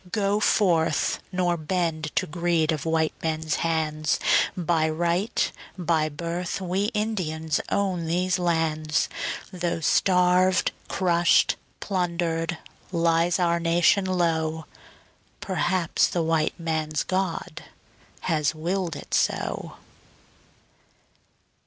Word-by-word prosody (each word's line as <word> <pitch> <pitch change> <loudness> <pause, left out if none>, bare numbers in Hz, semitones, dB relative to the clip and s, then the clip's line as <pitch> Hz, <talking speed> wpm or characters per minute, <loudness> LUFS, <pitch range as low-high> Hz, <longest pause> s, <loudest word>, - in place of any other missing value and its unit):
Go 205 0 +1
forth, 170 -8 +2
nor 180 -2 +1
bend 160 -1 -1
to - - +2
greed 170 -1 0
of 155 0 -3
white 160 -1 +1
men's 160 -1 -1
hands, 155 -2 0 0.4
By 165 -2 +1
right, 175 +7 0 0.3
by 160 -3 +1
birth 170 +5 -4
we 190 +2 -1
Indians 180 -9 -1
own 185 -4 0
these 180 +2 +1
lands, 160 -3 0 0.5
Though 175 -2 -2
starved, 180 +2 +3 0.2
crushed, 175 -2 +3 0.3
plundered, 170 -3 -1 0.3
lies 170 0 +2
our 170 -2 +2
nation 175 +4 +3
low... 160 -3 0 0.7
Perhaps 185 -3 +1
the 170 - -1
white 160 0 0
man's 155 -2 -1
God 185 -3 -3 0.6
has 155 -2 0
willed 175 +2 -2
it - - -9
so. - - -1
170 Hz, 100 wpm, -25 LUFS, 160-180 Hz, 0.7 s, starved